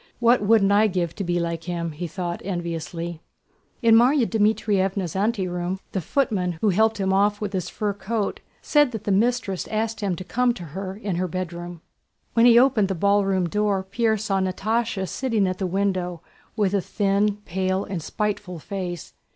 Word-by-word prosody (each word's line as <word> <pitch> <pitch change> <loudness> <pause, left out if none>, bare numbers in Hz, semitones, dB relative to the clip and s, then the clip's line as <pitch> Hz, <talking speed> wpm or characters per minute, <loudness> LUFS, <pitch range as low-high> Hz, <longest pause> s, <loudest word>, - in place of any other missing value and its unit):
What 235 0 +4
wouldn't 205 -1 +4
I 210 +2 +5
give 175 -4 -1
to 200 - -4
be 175 -1 0
like 170 -1 -3
him!" 170 -2 -3
he 165 +3 -5
thought 175 +1 -4
enviously. 170 -2 -4 0.6
In 230 -1 +6
Márya 245 +3 +5
Dmítrievna's 200 -5 +1
anteroom 190 -3 -1
the 190 - -2
footman 190 - 0
who 190 +6 0
helped 220 +3 +3
him 190 -1 +1
off 205 +1 +2
with 205 -2 -4
his 185 -3 -2
fur 210 -1 -2
coat 205 +1 -2 0.2
said 295 -4 +3
that 220 -2 -5
the 205 - -1
mistress 200 -2 +1
asked 220 +1 -2
him 200 -4 -1
to 185 - -7
come 245 +6 +1
to 180 - -8
her 190 +5 -6 0.3
bedroom. 175 -1 -5 0.5
When 230 +1 +5
he 235 -1 +7
opened 240 -5 +4
the 190 - -2
ballroom 195 -1 +2
door 205 0 0
Pierre 220 +3 0
saw 200 -2 -1
Natásha 195 +2 -1
sitting 230 -5 0
at 185 0 -3
the 190 - -1
window, 185 -2 -1 0.3
with 205 -3 +1
a 200 - +2
thin, 200 +1 +1
pale, 185 +2 -1
and 190 -4 -4
spiteful 205 0 -3
face. 175 0 -6
195 Hz, 175 wpm, -24 LUFS, 180-215 Hz, 0.6 s, he